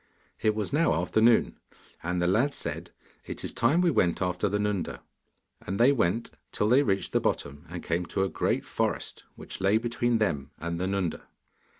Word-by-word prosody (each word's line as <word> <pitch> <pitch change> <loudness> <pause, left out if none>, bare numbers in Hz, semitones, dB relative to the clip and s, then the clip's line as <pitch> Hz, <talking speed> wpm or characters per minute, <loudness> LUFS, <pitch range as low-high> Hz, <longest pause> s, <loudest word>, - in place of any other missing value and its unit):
It 110 -1 +2
was 105 +1 -3
now 150 - +3
afternoon, 110 +6 +3 0.4
and 90 +1 -2
the 90 - +1
lad 115 +11 +2
said: - - -5 0.4
'It - - -6
is - - -4
time 145 +10 +3
we 175 -2 +3
went 85 - +2
after 90 +1 0
the 105 - 0
Nunda.' 105 -3 -2 0.6
And 95 +2 -4
they 125 +4 +6
went 115 -3 0 0.2
till 105 - 0
they 130 +4 +6
reached 100 -8 0
the - - +3
bottom 70 +4 -2
and 90 0 -6
came 85 +1 -1
to 95 - 0
a - - +1
great - - -1
forest - - -2
which - - -9
lay 100 +3 +4
between 120 +1 0
them 75 -11 -1
and 85 0 -4
the 95 - 0
Nunda. 95 -3 -2
100 Hz, 190 wpm, -28 LUFS, 90-115 Hz, 0.6 s, they